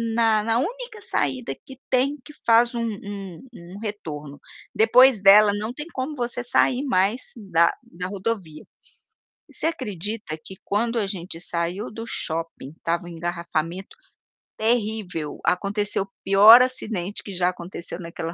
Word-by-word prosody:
na 225 -2 +3
na 225 +1 +1
única 465 - -4
saída 135 - -2
que 265 - -12
tem 265 +3 +2
que 300 - -12
faz 235 +2 +5
um 235 - -2
um 200 -5 -6
um 180 -1 -11
retorno, 150 -10 -6 0.4
depois 240 +1 +6
dela 205 +1 +8
não 210 +3 -3
tem 295 +3 -7
como 270 +4 -3
você 245 -1 -3
sair 250 +2 +2
mais 225 -2 +1 0.2
da 175 -6 +3
da 180 +2 -7
rodovia. 190 -5 -4 0.9
Você - - -1
acredita 210 - -3
que 190 - -10
quando 230 +3 0
a 215 - +1
gente 180 -4 -6
saiu 175 +4 -3
do 225 +1 -7
shopping 165 -8 -4
estava 170 +1 -1
um - - -9
engarrafamento 170 - -4 0.6
terrível, 215 -8 -1
aconteceu 200 +2 0
o 195 - -18
pior 210 +5 +9
acidente 215 -7 -2
que 200 - -8
já 180 -1 +1
aconteceu 175 -1 -6
naquela 170 -1 -6
205 Hz, 145 wpm, -24 LUFS, 175-230 Hz, 0.9 s, pior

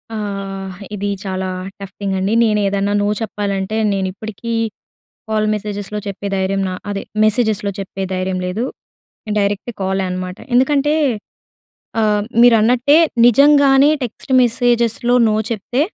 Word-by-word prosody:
ఆ! - - -3 0.8
ఇది 200 0 -3 0.2
చాలా 190 -1 -3 0.3
టఫ్ 195 0 -9
థింగ్ 195 -1 -2
అండి. 195 +4 0
నేను 210 -1 +2
ఏదన్నా 200 +1 0
నో 205 - +1
చెప్పాలంటే 200 -1 -2 0.2
నేను 190 -1 -1
ఇప్పటికీ 220 +3 -6 0.8
కాల్ 215 -1 +1
మెసేజెస్‍లో 210 0 -4
చెప్పే 200 +1 -5
ధైర్యం 195 +1 0
నా - - -4 0.2
అదే 200 -1 -3 0.2
మెసేజెస్‌లో 215 -2 +1
చెప్పే 195 0 -5
ధైర్యం 185 0 -2
లేదు. 185 +6 -2 0.7
డైరెక్ట్ 205 +3 -1
కాలే 190 0 0
అనమాట. 180 0 -5 0.2
ఎందుకంటే 285 +3 +3 1.1
ఆహ్, 210 -1 +2 0.2
మీరన్నట్టే 245 +5 +5 0.3
నిజంగానే 280 +2 +6
టెక్స్ట్ 250 +2 -5
మెసేజెస్‌లో 240 0 +1
నో 215 - +1 0.2
చెప్తే 240 +4 -2
210 Hz, 125 wpm, -18 LUFS, 195-240 Hz, 1.1 s, నిజంగానే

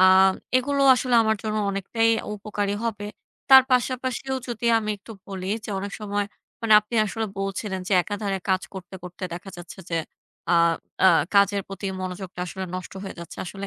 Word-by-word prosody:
আ - - +7 0.5
এগুলো 280 +2 +1
আসলে 250 0 0
আমার 220 0 +2
জন্য 215 -1 -2
অনেকটাই 225 +4 0 0.3
উপকারী 205 -1 -2
হবে। 205 -3 -3 0.4
তার 265 -1 +11
পাশাপাশিও 255 +1 0
যদি 235 0 -3
আমি 215 -1 -3
একটু 215 +3 -12
বলি 190 -2 -6 0.2
যে 215 - -5
অনেক 200 +1 -5
সময় 205 -1 -1 0.4
মানে 225 -1 +2
আপনি 210 +3 -9
আসলে 220 +2 -3
বলছিলেন 195 0 -3
যে - - -1
একাধারে 205 0 -3
কাজ 190 0 +2
করতে, 185 0 -9
করতে 180 +2 -10
দেখা 180 +3 -7
যাচ্ছে 175 +2 -10
যে 165 - 0 0.6
আ - - +6 0.5
আ - - +9 0.3
কাজের 200 0 +4
প্রতি 195 0 -6
মনোযোগটা 185 0 -6
আসলে 190 +2 -5
নষ্ট 185 - -6
হয়ে 195 - -6
যাচ্ছে 170 -1 -9
আসলে 195 +2 -6
205 Hz, 170 wpm, -24 LUFS, 190-225 Hz, 0.6 s, তার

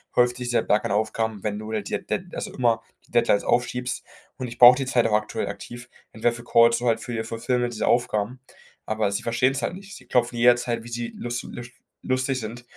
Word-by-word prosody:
häuft 125 0 +3
sich 125 -1 -4
der 120 - +2
Berg 105 - +1
an - - -2
Aufgaben, 110 0 -1
wenn 105 -1 -2
du 110 0 -7
da - - -1
halt 100 - -5
die - - -2
Dead - - -4
also - - -4
immer 120 -2 +1 0.3
die - - -27
Deadlines 115 -3 +3
aufschiebst. 125 0 -1 0.3
Und 130 - -4
ich 120 0 -9
brauche 125 0 +10
die 135 - -2
Zeit 125 -3 +2
auch 110 - -1
aktuell 105 0 0
aktiv, 120 0 -8 0.3
entweder 115 +2 +1
für 120 0 -9
Calls, 115 0 +5
so 120 - -2
halt 115 -1 +2
für 120 - -6
die 110 -1 -2
Fulfillment 120 +2 -1
dieser - - -1
Aufgaben. 120 0 0 0.5
Aber 110 -2 0
sie 100 - -1
verstehen 125 +3 +2
es 135 - -3
halt - - -1
nicht. 195 +1 -11
Sie - - -16
klopfen 120 -1 +1
jederzeit, 120 -1 +3
wie - - -11
sie 120 0 -4
lus 120 0 -4
lusch 120 0 -9 0.3
lustig 130 0 0
sind 115 +1 -7
120 Hz, 235 wpm, -24 LUFS, 110-125 Hz, 0.5 s, brauche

